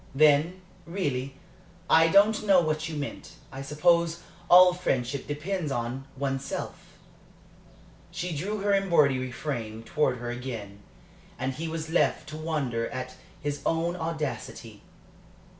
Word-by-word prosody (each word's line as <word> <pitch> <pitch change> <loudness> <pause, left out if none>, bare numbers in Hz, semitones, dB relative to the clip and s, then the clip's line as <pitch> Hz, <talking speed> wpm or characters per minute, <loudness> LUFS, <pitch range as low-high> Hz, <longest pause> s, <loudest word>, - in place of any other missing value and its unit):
"Then, 155 +5 +4 0.3
really, 140 -7 -2 0.5
I 165 0 +6
don't 205 +5 +4
know 195 -3 +6
what 155 -1 -1
you 160 - -5
meant. 145 -1 -6 0.2
I 135 0 -7
suppose 165 +4 +2 0.3
all 180 0 +9
friendship 135 -6 -2
depends 155 +2 -3
on 125 +2 -3
one's 135 0 -2
self." - - -7 1.1
She 175 -2 -4
drew 200 +7 -3
her 200 0 +2
embroidery 150 -10 +3
frame 115 -6 -5
towards 125 -1 0
her 120 0 -4
again, 115 -5 -6 0.6
and 130 +1 -2
he 160 +5 -5
was 160 0 -5
left 170 - +1
to 155 - -7
wonder 140 -8 -2
at 130 0 -5 0.3
his 145 -1 -2
own 165 +2 0
audacity. 160 -4 -5
150 Hz, 130 wpm, -27 LUFS, 130-170 Hz, 1.1 s, all